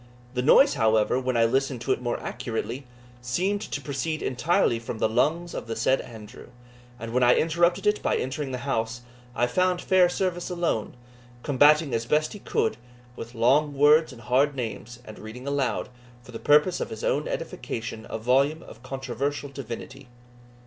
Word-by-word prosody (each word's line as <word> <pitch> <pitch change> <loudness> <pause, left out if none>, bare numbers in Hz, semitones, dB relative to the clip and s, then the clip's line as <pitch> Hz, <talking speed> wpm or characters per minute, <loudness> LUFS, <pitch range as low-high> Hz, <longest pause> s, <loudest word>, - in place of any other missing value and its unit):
The 125 - -1
noise, 155 - +6
however, 110 -1 +2
when 130 -1 -1
I 115 - +4
listened 135 +1 0
to - - -1
it - - 0
more 120 -1 -2
accurately, 125 +1 -5 0.3
seemed 185 +12 -1
to - - -4
proceed 155 +3 -3
entirely 135 -1 +1
from 115 0 -6
the - - +2
lungs 165 +10 0
of - - -6
the 115 - -3
said 125 +4 +2
Andrew; 110 0 -12 0.5
and 115 0 -6
when 125 - +2
I 125 0 +6
interrupted 170 +2 +2
it 210 0 +2
by - - +1
entering 135 +1 -3
the 130 - -3
house, 120 -3 -2 0.3
I 120 - +2
found 180 +7 +1
Fairservice 180 -1 +1
alone, 170 -13 -2 0.5
combating 145 +1 +4
as 115 0 -1
he - - -18
best 155 +7 0
could, 110 - 0 0.4
with 120 0 -9
long 140 +6 +3
words 150 +2 +5
and 120 -3 -13
hard 135 +5 +2
names, 120 -1 -5
and 110 - -11
reading 110 +4 -9
aloud, 140 -2 -1 0.3
for 125 - -13
the 115 - -7
purpose 150 +5 +4
of - - -3
his - - -7
own - - 0
edification, 115 - -5
a - - -3
volume 135 +7 +1
of 115 - -13
controversial 135 +2 -4
divinity. 135 +1 -8
130 Hz, 175 wpm, -26 LUFS, 120-155 Hz, 0.5 s, noise